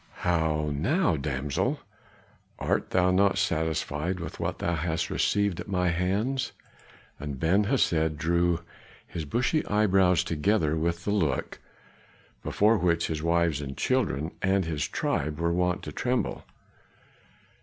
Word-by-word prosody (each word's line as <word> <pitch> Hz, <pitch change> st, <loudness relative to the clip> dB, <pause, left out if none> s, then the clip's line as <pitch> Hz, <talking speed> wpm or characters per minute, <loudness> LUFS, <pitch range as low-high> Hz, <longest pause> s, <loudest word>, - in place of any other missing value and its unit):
"How 80 Hz, -3 st, +1 dB
now, 130 Hz, -, +1 dB
damsel, 70 Hz, 0 st, -1 dB, 0.8 s
art -, -, -1 dB
thou 90 Hz, 0 st, +3 dB
not 95 Hz, +1 st, +3 dB
satisfied 80 Hz, -1 st, -1 dB
with 85 Hz, -, -7 dB
what -, -, -2 dB
thou 85 Hz, -, -1 dB
hast 80 Hz, 0 st, -1 dB
received 100 Hz, -3 st, +1 dB
at -, -, -6 dB
my 90 Hz, -3 st, +1 dB
hands?" 100 Hz, +10 st, -1 dB, 0.7 s
and 70 Hz, -2 st, -5 dB
Ben 95 Hz, +7 st, +3 dB
Hesed 80 Hz, -, +1 dB
drew 85 Hz, +1 st, +1 dB, 0.4 s
his 80 Hz, -3 st, -6 dB
bushy 125 Hz, -, +1 dB
brows 95 Hz, -4 st, +3 dB
together 80 Hz, -1 st, +1 dB
with 85 Hz, +2 st, -1 dB
the 105 Hz, -, 0 dB
look 80 Hz, -10 st, -1 dB, 0.8 s
before 105 Hz, +1 st, +2 dB
which 85 Hz, -1 st, +2 dB
his 80 Hz, -2 st, -2 dB
wives, 85 Hz, -2 st, +1 dB
his 70 Hz, -1 st, -6 dB
children 75 Hz, +6 st, 0 dB
and 95 Hz, -1 st, +2 dB
his 80 Hz, -3 st, -2 dB
tribe 75 Hz, +1 st, -2 dB
were 85 Hz, 0 st, +1 dB
wont 90 Hz, 0 st, 0 dB
to 75 Hz, -, -6 dB
tremble. 125 Hz, +10 st, -2 dB
85 Hz, 135 wpm, -27 LUFS, 80-95 Hz, 0.8 s, thou